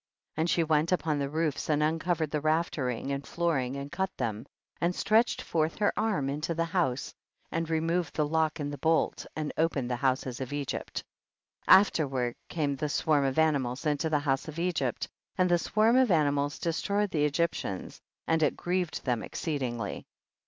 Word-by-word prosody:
21. 160 - -2
And 165 - +1
she 170 - +3
went 155 +1 +2
upon 155 -5 +1
the 140 -1 -1
roofs 155 -1 -1
and 150 0 +3
uncovered 160 0 0
the 150 - -1
raftcringt 145 -5 0
and 140 0 -3
flooring 140 -7 0
and 140 +1 -6
cut 190 0 -1
them, 115 0 -3 0.3
and 175 +1 +1
stretched 225 +3 +2
forth 160 0 0
her 205 -1 +2
arm 210 -11 0
into 150 +4 -2
the 165 +1 +1
house 165 -7 -1 0.4
and 165 0 -2
re 160 -1 +2
moved 165 +2 -1
the 150 - +2
lock 160 +1 +1
and 145 0 -3
the 145 - -7
bolt, 160 +3 +1
and 155 -1 -3
opened 140 -6 +1
the - - +1
houses 130 -1 0
of 130 - -4
Egypt. 145 -2 -3 0.6
22. 185 - +10
Afterward 135 -10 -1
came 145 -4 -1
the 150 +2 -2
swarm 145 -1 +2
of 135 +1 -1
animals 140 -4 +1
into 150 +1 +1
the 155 - +3
houses 140 -1 0
of 155 0 -7
Egypt, 165 -8 -1 0.3
and 180 -1 +3
the 175 - +4
swarm 215 +6 +3
of 260 -2 +4
animals 145 -3 +2
destroyed 200 +4 0
the 150 -2 +2
Egyptians, 150 - -2 0.2
and 160 0 +1
it 150 - +2
grieved 180 -2 -2
them 125 -4 +1
exceedingly. 125 - -3
155 Hz, 185 wpm, -29 LUFS, 140-170 Hz, 0.6 s, 22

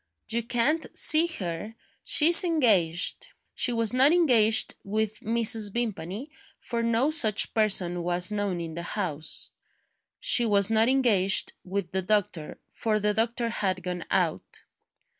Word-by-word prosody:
"You 230 +1 -1
can't 245 +7 -1
see 315 +2 +5
her 210 - -6 0.3
she's 335 +4 +6
engaged." 220 - +1 0.3
She 245 - 0
was 230 -1 0
not 265 +4 +4
engaged 240 -11 +3
with 215 +1 -3
Mrs. 225 -3 +1
Vimpany, 220 - -5 0.3
for 235 -1 -5
no 230 +5 0
such 220 -9 +2
person 190 -5 0
was 175 +3 0
known 205 -4 -3
in 165 -1 -7
the 170 - -6
house. 170 -5 -5 0.7
She 255 - +3
was 200 0 +2
not 225 +2 +2
engaged 220 -8 +2
with 185 -1 -5
the 190 - -2
doctor, 185 -5 -3
for 215 -2 -2
the 210 0 -1
doctor 230 +2 -2
had 190 -5 -3
gone 180 -1 -5
out. - - -3
215 Hz, 140 wpm, -25 LUFS, 185-240 Hz, 0.7 s, she's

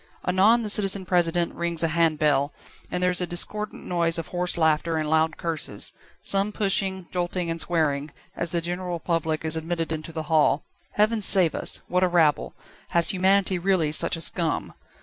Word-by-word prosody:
Anon 205 +6 +4
the 215 - -4
Citizen 195 -2 +3
President 175 -1 +1
rings 170 -1 -2
a 165 - +1
hand 165 -1 +1
bell, 145 -1 +1 0.4
and 180 0 -3
there 180 - +3
is 180 - 0
a 180 - -1
discordant 210 +5 -2
noise 170 -2 +1
of 165 - -5
hoarse 180 0 0
laughter 160 0 +1
and 155 -1 -2
loud 160 +1 +1
curses, 155 -11 -2 0.3
some 200 +1 +1
pushing, 195 -3 0
jolting, 175 -1 -2
and 165 0 -1
swearing, 155 -3 0 0.3
as 170 - -3
the 170 +1 -1
general 175 0 -4
public 160 -2 -2
is 160 0 +3
admitted 165 0 -3
into 160 +1 -5
the 160 -1 -5
hall. 155 -2 +2 0.3
Heaven 215 +1 +1
save 185 -5 +4
us! - - -3
What 180 +1 +1
a - - +4
rabble! 165 -4 +1 0.3
Has 170 -1 +4
humanity 190 -1 +2
really 175 -4 +1
such 155 - +3
a - - -6
scum? 165 0 -1
170 Hz, 185 wpm, -24 LUFS, 160-185 Hz, 0.4 s, Anon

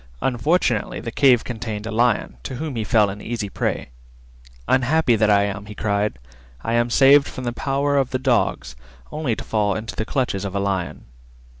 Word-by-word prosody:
Unfortunately 130 - 0
the 115 - -6
cave 125 -3 +4
contained 110 -3 -5
a 110 - -4
Lion, 115 - +1
to 130 - -6
whom 150 +1 -4
he 115 - -1
fell 105 -2 +3
an 100 +1 -9
easy 115 -3 -4
prey. - - -3 0.8
"Unhappy 130 0 +3
that 110 0 +2
I 100 -1 +4
am," 100 0 -4
he 105 - -9
cried, 100 - -1 0.5
"I 115 - -1
am 120 0 +2
saved 140 +3 +6
from 130 - -7
the 120 -1 -2
power 140 +2 0
of 135 -2 +1
the 130 - -1
dogs 120 - 0 0.4
only 150 -7 -1
to - - -7
fall 105 -3 0
into 110 +2 -5
the - - -2
clutches 120 -5 -1
of 100 -1 -5
a - - +1
Lion." 100 -3 -3
115 Hz, 190 wpm, -22 LUFS, 105-130 Hz, 0.8 s, saved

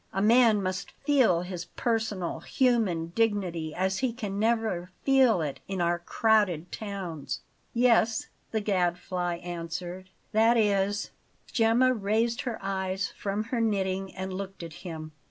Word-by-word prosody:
A 195 - -1
man 220 -1 +5
must 185 +1 -3 0.2
feel 255 - +4
his 180 -1 -5
personal, 220 -6 -2
human 220 - +1
dignity 185 -8 0
as 190 +1 0
he 260 -2 +1
can 210 -4 -4
never 220 -5 0
feel 260 -8 +4
it 145 -2 -4
in 195 -1 -3
our 175 0 +1
crowded 185 -3 +2
towns." 170 -10 -5 0.3
"Yes," 230 -2 +3 0.2
the 220 - -1
Gadfly 180 -2 0
answered; 175 +2 -5 0.2
"that 225 +2 +4
is 205 -1 +1 0.2
" - - -24
Gemma 235 +3 +4
raised 225 +3 0
her 240 -4 -3
eyes 190 0 -1
from 205 +1 -2
her 235 - +2
knitting 195 -3 -1
and 190 0 -4
looked 195 -1 -6
at 165 -2 -7
him. 160 -3 -7
195 Hz, 140 wpm, -28 LUFS, 180-225 Hz, 0.3 s, man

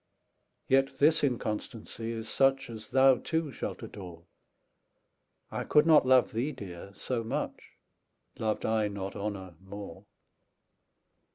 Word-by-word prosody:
Yet 135 +1 +3
this 155 +2 +4
inconstancy 115 -2 -3
is 115 -1 -5
such 135 0 +2
As 110 -1 -9
thou 135 -1 +6
too 160 0 -2
shalt - - -5
adore; 90 -6 -9 1.3
10 - - -3
I - - -2
could 150 0 +4
not 155 -5 +6
love 130 -1 +5
thee, 125 +7 -1
Dear, 100 - -9
so 120 +2 -3
much, 115 - -3 0.8
Loved 110 -1 -1
I 110 -1 +2
not 100 -1 -5
Honour 100 -3 -4
more. 100 -2 -9
115 Hz, 125 wpm, -30 LUFS, 100-135 Hz, 1.3 s, thou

